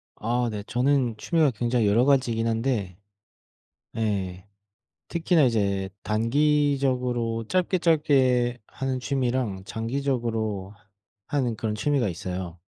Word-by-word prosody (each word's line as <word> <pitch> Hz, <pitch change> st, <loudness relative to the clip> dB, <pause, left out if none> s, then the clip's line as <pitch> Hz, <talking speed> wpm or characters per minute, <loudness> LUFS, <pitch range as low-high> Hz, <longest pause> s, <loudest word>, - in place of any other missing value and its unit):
아 120 Hz, +2 st, -1 dB
네 105 Hz, -1 st, -5 dB
저는 125 Hz, -1 st, +1 dB
취미가 155 Hz, +4 st, +2 dB
굉장히 120 Hz, -1 st, 0 dB
여러 115 Hz, +5 st, +4 dB
가지이긴 125 Hz, -5 st, +2 dB
한데 115 Hz, -6 st, -1 dB, 1.0 s
예 95 Hz, -4 st, -2 dB, 0.6 s
특히나 170 Hz, -1 st, +2 dB
이제 100 Hz, -6 st, +1 dB
단기적으로 125 Hz, -1 st, +1 dB
짧게 185 Hz, -, +1 dB
짧게 130 Hz, -7 st, +3 dB
하는 135 Hz, -1 st, -3 dB
취미랑 125 Hz, -7 st, -1 dB
장기적으로 115 Hz, -5 st, -2 dB, 0.5 s
하는 130 Hz, -5 st, 0 dB
그런 110 Hz, 0 st, -2 dB
취미가 135 Hz, +1 st, +1 dB
있어요. 90 Hz, 0 st, -5 dB
120 Hz, 250 characters per minute, -25 LUFS, 110-135 Hz, 1.0 s, 여러